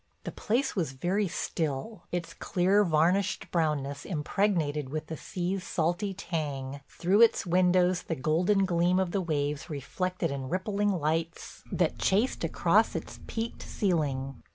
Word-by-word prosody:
The -, -, -4 dB
place 255 Hz, +6 st, 0 dB
was 165 Hz, -9 st, -1 dB
very 185 Hz, +9 st, 0 dB
still, 170 Hz, +3 st, -3 dB
its 175 Hz, -1 st, -3 dB
clear, 190 Hz, +3 st, +2 dB
varnished 180 Hz, +3 st, +1 dB
brownness 145 Hz, -4 st, 0 dB
impregnated 155 Hz, -4 st, 0 dB
with 155 Hz, +2 st, -3 dB
the 160 Hz, -, -5 dB
sea's 185 Hz, +3 st, -3 dB
salty 175 Hz, +5 st, 0 dB
tang, 145 Hz, -7 st, -4 dB
through 190 Hz, +5 st, +2 dB
its 230 Hz, -, +5 dB
windows 180 Hz, 0 st, +3 dB
the 165 Hz, -, -3 dB
golden 175 Hz, +8 st, +2 dB
gleam 175 Hz, 0 st, +2 dB
of 185 Hz, -2 st, 0 dB
the 195 Hz, -, 0 dB
waves 150 Hz, -2 st, -2 dB
reflected 175 Hz, +5 st, -2 dB
in 135 Hz, -2 st, -4 dB
rippling 200 Hz, +4 st, 0 dB
lights 165 Hz, -1 st, -2 dB
that -, -, 0 dB
chased 210 Hz, +7 st, +1 dB
across -, -, +2 dB
its -, -, -5 dB
peaked 225 Hz, +1 st, -4 dB
ceiling. 140 Hz, -, -1 dB
175 Hz, 140 wpm, -29 LUFS, 150-190 Hz, -, its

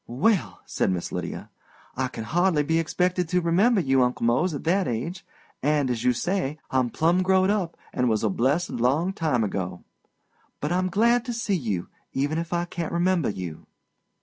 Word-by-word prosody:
"Well," 175 Hz, -, +1 dB
said -, -, 0 dB
Miss 90 Hz, -2 st, -2 dB
Lydia, -, -, -5 dB, 0.4 s
"I 130 Hz, 0 st, 0 dB
can 115 Hz, -3 st, -7 dB
hardly 170 Hz, +2 st, +2 dB
be 160 Hz, +2 st, +1 dB
expected 180 Hz, +1 st, 0 dB
to 180 Hz, -, +2 dB
remember 190 Hz, +7 st, +3 dB
you, 135 Hz, -5 st, +3 dB
Uncle 125 Hz, -1 st, +1 dB
Mose, 145 Hz, +9 st, +2 dB
at 140 Hz, -, -6 dB
that 185 Hz, +3 st, +2 dB
age. 130 Hz, +11 st, -3 dB, 0.4 s
And, 145 Hz, -2 st, +1 dB
as 120 Hz, -1 st, -2 dB
you 125 Hz, -, +4 dB
say, 155 Hz, +2 st, -1 dB
I'm 130 Hz, -2 st, +2 dB
'plum 170 Hz, +8 st, +2 dB
growed 190 Hz, +1 st, +3 dB
up,' 190 Hz, -5 st, -1 dB, 0.2 s
and 125 Hz, -2 st, +1 dB
was 110 Hz, -1 st, +1 dB
a 110 Hz, -, +2 dB
blessed 140 Hz, -, +1 dB
long 140 Hz, +10 st, +1 dB
time 150 Hz, -10 st, 0 dB
ago. 95 Hz, -3 st, -3 dB, 0.8 s
But 150 Hz, -, -2 dB
I'm 185 Hz, +1 st, +1 dB
glad 235 Hz, +5 st, +3 dB
to 245 Hz, -, -3 dB
see 230 Hz, -3 st, -1 dB
you, 105 Hz, -, -2 dB, 0.3 s
even 145 Hz, +4 st, 0 dB
if 165 Hz, 0 st, -5 dB
I 175 Hz, 0 st, 0 dB
can't 170 Hz, -1 st, -4 dB
remember 175 Hz, -2 st, +1 dB
you." 90 Hz, -6 st, -6 dB
160 Hz, 185 wpm, -25 LUFS, 125-180 Hz, 0.8 s, you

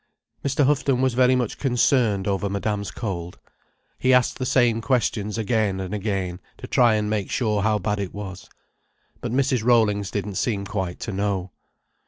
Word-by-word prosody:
Mr. 140 Hz, +1 st, +2 dB
Houghton 135 Hz, -2 st, +2 dB
was 130 Hz, -1 st, +2 dB
very 130 Hz, +1 st, +4 dB
much 125 Hz, -4 st, -2 dB
concerned 120 Hz, -6 st, +2 dB
over 100 Hz, 0 st, 0 dB
Madame's 100 Hz, 0 st, -2 dB
cold. 90 Hz, -3 st, -5 dB, 0.6 s
He 130 Hz, 0 st, +4 dB
asked 125 Hz, +1 st, +2 dB
the 130 Hz, -, -1 dB
same 120 Hz, -3 st, +3 dB
questions 115 Hz, -4 st, 0 dB
again 110 Hz, -3 st, 0 dB
and 95 Hz, +1 st, -5 dB
again, 95 Hz, -4 st, -2 dB, 0.2 s
to -, -, -8 dB
try 120 Hz, -3 st, +4 dB
and 105 Hz, -1 st, 0 dB
make 105 Hz, -2 st, -1 dB
sure 105 Hz, -4 st, 0 dB
how 110 Hz, +1 st, +2 dB
bad 105 Hz, +1 st, -2 dB
it 100 Hz, -3 st, -3 dB
was. 95 Hz, -3 st, -8 dB, 0.7 s
But -, -, -4 dB
Mrs. 130 Hz, -2 st, +1 dB
Rollings 105 Hz, -5 st, +3 dB
didn't 100 Hz, -1 st, -3 dB
seem 100 Hz, -5 st, -1 dB
quite 95 Hz, -4 st, -3 dB
to 115 Hz, -, -4 dB
know. 95 Hz, -2 st, -2 dB
105 Hz, 170 wpm, -23 LUFS, 100-125 Hz, 0.7 s, very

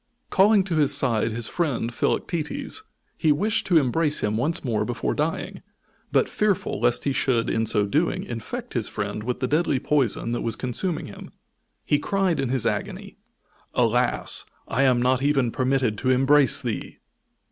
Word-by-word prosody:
Calling 200 Hz, +1 st, +5 dB
to 180 Hz, -4 st, -2 dB
his 145 Hz, -2 st, +5 dB
side 115 Hz, -4 st, +1 dB
his 115 Hz, +1 st, -2 dB
friend 135 Hz, -8 st, -2 dB
Philoctetes, 175 Hz, -, -2 dB, 0.4 s
he 155 Hz, -, +3 dB
wished 210 Hz, +9 st, 0 dB
to 175 Hz, -, +4 dB
embrace 150 Hz, +2 st, +1 dB
him 105 Hz, 0 st, 0 dB
once 150 Hz, +8 st, -1 dB
more 115 Hz, -4 st, 0 dB
before 70 Hz, -, -2 dB
dying; -, -, -3 dB, 0.5 s
but -, -, +3 dB
fearful 205 Hz, -, -1 dB
lest 120 Hz, +1 st, +2 dB
he 140 Hz, -, 0 dB
should, 125 Hz, -4 st, +1 dB
in 115 Hz, 0 st, 0 dB
so 105 Hz, -2 st, +2 dB
doing, 150 Hz, +12 st, 0 dB
infect 115 Hz, -2 st, -6 dB
his -, -, -1 dB
friend -, -, -4 dB
with 125 Hz, +3 st, -4 dB
the 130 Hz, -, +1 dB
deadly 150 Hz, -1 st, +1 dB
poison 130 Hz, -5 st, 0 dB
that 120 Hz, -, -2 dB
was 115 Hz, -2 st, -1 dB
consuming 150 Hz, +9 st, -2 dB
him, -, -, -10 dB, 0.6 s
he 145 Hz, -, +2 dB
cried 195 Hz, -4 st, 0 dB
in 135 Hz, -, -1 dB
his 130 Hz, -2 st, 0 dB
agony: 195 Hz, -, -4 dB, 0.6 s
"Alas, 120 Hz, 0 st, +2 dB, 0.2 s
I 125 Hz, -, 0 dB
am 125 Hz, -2 st, +3 dB
not 130 Hz, 0 st, +2 dB
even 135 Hz, -4 st, +1 dB
permitted 130 Hz, -4 st, 0 dB
to 130 Hz, -, -1 dB
embrace 135 Hz, 0 st, +4 dB
thee!" -, -, -4 dB
130 Hz, 170 wpm, -24 LUFS, 120-160 Hz, 0.6 s, Calling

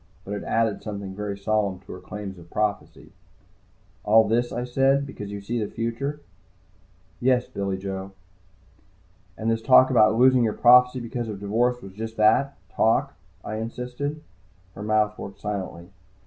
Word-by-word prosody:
But 100 Hz, -, -5 dB
it 105 Hz, -, -4 dB
added 115 Hz, -2 st, 0 dB
something 100 Hz, -2 st, -6 dB
very 100 Hz, 0 st, -4 dB
solid 100 Hz, -2 st, -1 dB
to -, -, -11 dB
her 90 Hz, -, -8 dB
claims 95 Hz, 0 st, -8 dB
of 85 Hz, 0 st, -15 dB
prophecy. 105 Hz, +1 st, -3 dB, 0.9 s
"All 110 Hz, +1 st, +5 dB
this," 120 Hz, +3 st, +1 dB
I 120 Hz, -, -3 dB
said. 135 Hz, +3 st, +2 dB
"Because 105 Hz, -7 st, -8 dB
you 100 Hz, 0 st, -6 dB
see 115 Hz, +3 st, -2 dB
the 105 Hz, -, -4 dB
future?" 130 Hz, +6 st, -3 dB, 1.0 s
"Yes, 125 Hz, 0 st, +2 dB
Billy 100 Hz, -1 st, -3 dB
Joe." 95 Hz, 0 st, -5 dB, 1.3 s
"And 110 Hz, +1 st, 0 dB
this 115 Hz, 0 st, -1 dB
talk 130 Hz, +2 st, +6 dB
about 110 Hz, -3 st, +5 dB
losing 130 Hz, 0 st, +5 dB
your 110 Hz, -2 st, +1 dB
prophecy 125 Hz, +1 st, +6 dB
because 120 Hz, 0 st, -4 dB
of 105 Hz, -2 st, -6 dB
divorce 120 Hz, +5 st, 0 dB
was 95 Hz, -, -10 dB
just 110 Hz, +2 st, -6 dB
that, 110 Hz, +6 st, +3 dB, 0.2 s
talk?" 135 Hz, +5 st, +2 dB, 0.3 s
I 110 Hz, -, -4 dB
insisted. 125 Hz, +6 st, -5 dB, 0.5 s
Her 100 Hz, -, -9 dB
mouth 105 Hz, 0 st, +1 dB
worked 100 Hz, -, -8 dB
silently. 95 Hz, -3 st, -5 dB
110 Hz, 160 wpm, -25 LUFS, 100-125 Hz, 1.3 s, talk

